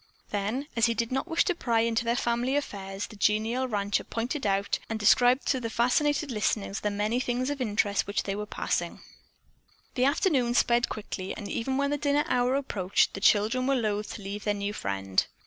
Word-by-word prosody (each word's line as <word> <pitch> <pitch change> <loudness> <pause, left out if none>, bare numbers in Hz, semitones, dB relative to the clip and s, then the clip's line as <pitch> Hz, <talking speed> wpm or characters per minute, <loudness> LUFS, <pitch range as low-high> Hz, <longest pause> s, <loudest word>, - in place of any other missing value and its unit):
Then, 210 +7 -2
as 230 0 +4
he 230 - 0
did 230 +1 -1
not 265 +1 -1
wish 330 +1 +2
to 365 - +2
pry 235 -9 +1
into 230 0 +1
their 235 0 +1
family 245 +1 0
affairs, 195 -8 -3
the - - -12
genial 220 +5 +1
rancher 205 -3 -1
pointed 245 +2 -3
out 200 0 0
and 220 -1 -2
described 245 +5 +4
to 250 -4 0
fascinated 280 +5 +1
listeners 210 -2 -1
the 210 - -1
many 210 +4 0
things 250 +2 -1
of 285 -2 -4
interest 205 -4 0
which 200 +1 -1
they 195 - -3
were 210 +1 -4
passing. - - -2 0.9
The 255 -1 +2
afternoon 275 -5 +2
sped 240 0 +3
quickly 200 -3 -5
and 205 - -6
even 265 +6 -2
when 280 0 +1
the 290 - +1
dinner 290 +1 +1
hour 250 -2 +2
approached 205 -9 +1
the 195 - -6
children 225 +6 +3
were 275 - +3
loath 210 -3 -2
to 205 - -9
leave 200 +1 -5
their 210 -1 0
new 200 0 -3
friend. 95 - 0
230 Hz, 200 wpm, -28 LUFS, 205-255 Hz, 0.9 s, as